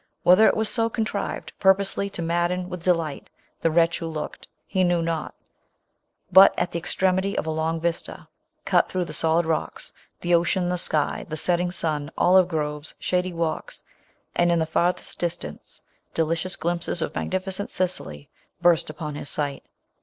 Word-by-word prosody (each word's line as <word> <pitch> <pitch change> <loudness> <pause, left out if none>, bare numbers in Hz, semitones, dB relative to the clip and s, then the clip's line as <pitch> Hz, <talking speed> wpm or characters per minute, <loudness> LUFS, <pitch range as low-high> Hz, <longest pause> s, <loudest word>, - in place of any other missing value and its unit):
Whether 185 +5 +7
it - - +2
was 220 0 +2
so 230 0 +1
contri 220 -3 -2
ved, - - -10
purposely 195 +1 +3
to 175 -3 -5
madden 175 +2 0
with 180 -2 -6
de 180 - +3
light 155 -4 -5 0.3
the 165 - +2
wretch 165 +1 +2
who 165 - -4
looked, 155 -2 -6 0.2
he 190 -1 0
knew 175 -1 +2
not; 165 -2 -3 1.0
but, 190 +1 +8
at 175 - 0
the 170 - -2
extremity 190 +3 0
of - - -1
a 160 - -1
long 160 +1 -1
vista, 170 0 -3 0.4
cut - - +3
through 185 -1 -1
the 155 - -7
solid 160 +2 +2
rocks, 120 - -3 0.3
the, 175 0 0
ocean, 175 +1 +2
the 180 - 0
sky, 155 -4 -1
the 155 - -4
setting 175 +2 +2
sun, 155 -4 -2
olive 185 0 +5
groves, 150 -3 -3
shady 180 0 -1
walks, 165 -2 -3 0.5
and, 175 0 +3
in 170 - +3
the 160 - +1
far 170 +2 +2
lQP*t - - -10
distance, 170 - -5 0.3
delicious 165 +3 -1
glimpses 170 0 -2
of - - -4
matruificent 190 +2 -3
Sicily, 175 - -1 0.3
burst 175 -3 +3
upon 155 -1 -5
his 145 0 -6
sight. 145 -2 -3
170 Hz, 175 wpm, -24 LUFS, 160-185 Hz, 1.0 s, but